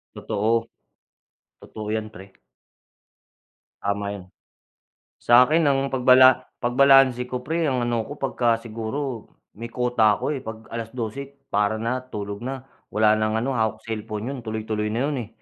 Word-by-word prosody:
Totoo, 115 +3 -1 0.9
totoo 105 -1 -8
'yan 110 -1 -2
pre. 95 +1 -13 1.5
Tama 100 0 -1
yun. 95 -3 -9 1.0
Sa 120 +1 +7
'kin 165 +2 +2
ang 135 -1 +1
pagbala 130 0 +6 0.2
pagbalanse 130 0 +5
ko 125 -1 -3
'pre, 165 +1 0
ang 125 -2 0
ano 120 -1 0
ko 145 - -8
'pagka 120 -4 +1
siguro 115 +2 -5 0.3
may 115 +1 -7
quota 120 -4 +2
ako, - - -6
eh, - - -5
'pag 110 0 -8
alas-dose, 115 +4 -5 0.2
para 105 +2 +1
na, 125 +3 -2
tulog 100 0 -5
na. 135 0 -5 0.3
Wala 110 0 +4
ng 110 0 0
ano, 130 - -1
hawak 110 -1 0
selpon, 110 0 -4
'yon 135 -3 -5
tuloy-tuloy 110 -1 -3
na 115 - -1
'yon. 145 -2 -2
Eh, 105 - -10
115 Hz, 150 wpm, -23 LUFS, 110-130 Hz, 1.5 s, Sa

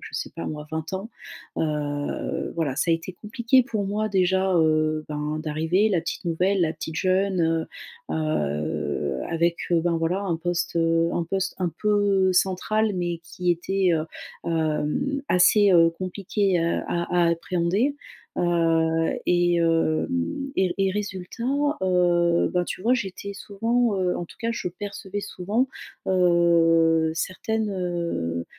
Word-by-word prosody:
je - - -8
sais - - -4
pas 165 - -4
moi, 150 0 -5
20 160 +2 -4
ans. 195 +5 -5 0.5
Heu, 145 -2 -2
voilà, 150 -6 -1
ça 165 - +1
a - - +5
été 165 +3 -6
compliqué 230 +6 +2
pour 220 -5 -3
moi 215 +2 -1
déjà, 190 -1 +2
heu, 155 -1 +2
ben, 150 +1 -2
d'arriver, 160 +7 +1
la 180 -4 +2
petite - - -5
nouvelle, 180 +3 +1
la 160 - +1
petite 160 0 -6
jeune, 190 +1 +1 0.7
heu, - - -1
heu, 75 - -1
avec, 170 +1 +1
heu, 170 -1 +4
ben, 170 0 +1
voilà, 165 +4 0
un 180 -5 -1
poste, 175 0 -2
heu, 165 0 +2
un 170 - -1
poste 190 +3 -2
un 180 -2 0
peu 200 -3 +3
central 200 +4 +1
mais 175 -1 -2
qui 175 +2 -3
était, 185 +2 +1
heu, 155 - 0 0.5
hem, 160 - 0
assez, 200 +3 +5
heu, 165 -1 +6
compliqué 185 +2 -1
à 170 0 0
a 170 0 +1
appréhender, 180 - 0 0.4
heu, 165 -1 +2 0.2
et 175 0 +3
hem, 170 - 0
et 185 -2 +1
et 195 -1 +2
résultat, 205 +2 -5 0.4
heu, 175 -2 +3
bah, 180 0 +2
tu - - -5
vois, 240 +4 +4
j'étais 200 -3 -4
souvent, 225 +3 0
heu, 180 -1 +1
en - - -4
tout - - -15
cas 230 - -1
je 230 - -3
percevais 200 +1 -6
souvent, 205 +7 -1 0.4
heu, 165 -3 +4
certaines, 215 +6 -2
heu, 170 - -2
175 Hz, 150 wpm, -24 LUFS, 165-195 Hz, 0.7 s, heu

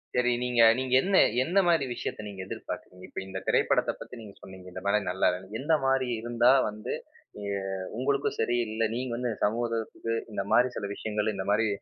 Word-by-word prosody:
சரி 125 0 +3
நீங்க 120 -1 +2 0.2
நீங்க 130 -1 -2
என்ன 195 0 +1 0.3
என்ன 180 +6 -1
மாரி 165 -5 +3
விஷயத்த 105 -2 -5
நீங்க 95 -2 -7
எதிர்பார்த்தீங்க, 90 -1 -7
இப்ப - - -6
இந்த 95 - -5
திரைப்படத்த - - +3
பத்தி 125 - -9
நீங்க 100 -2 -11
சொன்னீங்க 95 -1 -12
இந்த 95 - -7
படம் 100 0 +2
நல்லா 95 - +2
இல்லைன்னு, 95 +4 -5
எந்த 155 +4 +1
மாரி 135 -1 +2
இருந்தா 120 +1 +4 0.2
வந்து, 105 0 -5 0.5
அ - - -8 0.6
உங்களுக்கு 140 +2 +1
சரி, 120 +2 +1
இல்ல 110 +1 0
நீங்க 125 -1 -3
இந்த 120 -2 0
சமூகத்துக்கு, 115 0 -2 0.2
இந்த 100 -1 -2
மாரி 125 +1 +5
சில 100 - -3
விஷயங்கள், 105 0 -1
இந்த 95 0 -4
மாரி 110 +1 +3
115 Hz, 185 wpm, -28 LUFS, 105-125 Hz, 0.6 s, மாரி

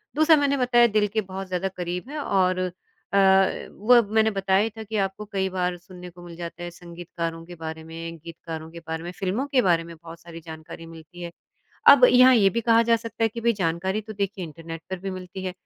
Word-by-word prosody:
दूसरा 310 +2 +6
मैंने 280 -1 +1
बताया 245 -2 +4
दिल 210 -2 +1
के 220 - +1
बहुत 190 -1 -7
ज़्यादा 185 +1 -2
करीब 180 +6 -4
है 300 +1 -5
और 185 -2 +1 0.5
अ, - - +3 0.5
वो 240 +3 +5
मैंने 220 0 +3
बताया 195 -1 +1
ही 225 - -1
था 220 - -6
कि 220 +1 -7
आपको 195 +1 -2
कई 190 -1 0
बार 180 -1 -2
सुनने 180 0 -12
को 175 0 -15
मिल 170 -1 -10
जाता 170 0 -7
है 175 - -5
संगीतकारों 170 -1 -7
के 175 +1 -11
बारे 160 -1 -7
में 165 +1 -8
गीतकारों 165 -1 -8
के 170 - -9
बारे 160 0 -4
में, 175 - -6
फ़िल्मों 195 +8 -2
के 270 -3 +2
बारे 170 -5 +2
में 170 0 -11
बहुत 165 +1 -12
सारी 165 0 -10
जानकारी 160 +1 -10
मिलती 165 +2 -13
है। 170 -1 -6 0.6
अब 270 -3 +9
यहाँ 255 +1 +7
ये 200 -4 +5
भी 235 +3 -2
कहा 230 0 +4
जा 230 0 +3
सकता 230 0 -5
है - - +5
कि 230 +2 -7
भई 235 0 +2
जानकारी 190 +2 -1
तो 215 +1 -9
देखिए 200 -1 -3
इंटरनेट 165 +1 -9
पर 190 -1 -4
भी 195 +2 -5
मिलती 185 0 -8
है। 185 - -3
185 Hz, 230 wpm, -24 LUFS, 170-220 Hz, 0.6 s, अब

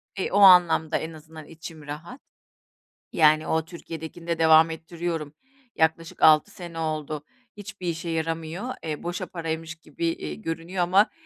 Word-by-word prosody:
E, 190 - -3
o 200 - +2
anlamda 175 -4 +6
en 160 +1 -6
azından 155 0 -12
içim 165 -1 -10
rahat. 165 - -8 0.9
Yani 155 -1 +4
o 160 0 0
Türkiye'dekini 165 0 -9
de 170 -1 -1
devam 160 0 +6
ettiriyorum. 165 -2 -5 0.4
Yaklaşık 160 +1 0
6 155 +5 +6
sene 170 -4 -9
oldu. 155 -2 -3 0.3
Hiçbir 205 -3 -8
işe 170 +1 -3
yaramıyor, 165 +8 -3
eee, 155 -2 -4
boşa 175 +1 -4
paraymış 165 -1 -5
gibi, 160 +1 -5
eee, 75 - -3
görünüyor 165 - -4
ama 195 +5 +4
165 Hz, 145 wpm, -25 LUFS, 160-175 Hz, 0.9 s, anlamda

